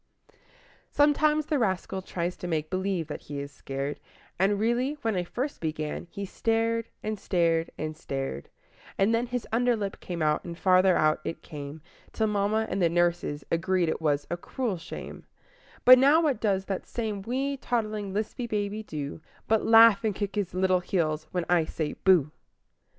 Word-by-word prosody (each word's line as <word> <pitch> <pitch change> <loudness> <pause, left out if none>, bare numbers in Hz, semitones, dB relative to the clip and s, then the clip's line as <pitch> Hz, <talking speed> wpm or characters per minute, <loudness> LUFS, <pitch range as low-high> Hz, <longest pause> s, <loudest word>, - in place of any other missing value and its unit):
Sometimes 300 +1 +3
the 300 -2 0
rascal 190 -3 -1
tries 175 -1 -3
to 180 - -6
make 155 -2 -2
believe 185 -2 -1
that - - -7
he 145 -1 -6
is 140 0 -6
scared, 135 +1 -5 0.4
And 200 +2 +2
really, 240 +6 +1
when 225 -2 0
I 180 - 0
first 255 +10 -4
began, 155 0 -3
he 200 +2 -5
stared, 225 +3 0 0.2
and 215 -1 -3
stared, 165 -3 +1
and 155 0 -4
stared; 135 - -5 0.5
And 200 +4 +3
then 235 +2 +1
his 245 -1 -3
under 245 +1 +3
lip 200 -3 -4
came 170 -3 -4
out 150 0 +1
and 170 -1 -7
farther 185 0 +4
out 155 0 +3
it 165 - -5
came, 145 0 -8 0.3
Till 220 - +1
mamma 210 +1 +1
and 190 +1 -2
the 170 - +4
nurse 175 0 +2 0.3
agreed 170 +1 +1
it - - -2
was 145 -2 +1
a 175 - -1
"cruel 220 +2 -3
shame" - - -9 0.6
But 255 0 +10
now 285 +5 +6
what 295 -9 +1
does 195 -3 +1
that 195 -2 -4
same 215 -4 -3
wee, 265 +6 -1
toddling, 215 -5 -2
lisping 215 +4 -3
baby 210 -1 -2
do 150 -6 -6 0.3
But 220 -1 +2
laugh 225 -1 +7
and 215 -3 0
kick 205 0 -3
his 195 -4 -2
little 185 0 +3
heels 155 -4 -1
when 180 -2 -1
I 175 -2 +3
say 155 -1 -3
"Booh!" 170 -6 +3
190 Hz, 180 wpm, -27 LUFS, 165-225 Hz, 0.6 s, But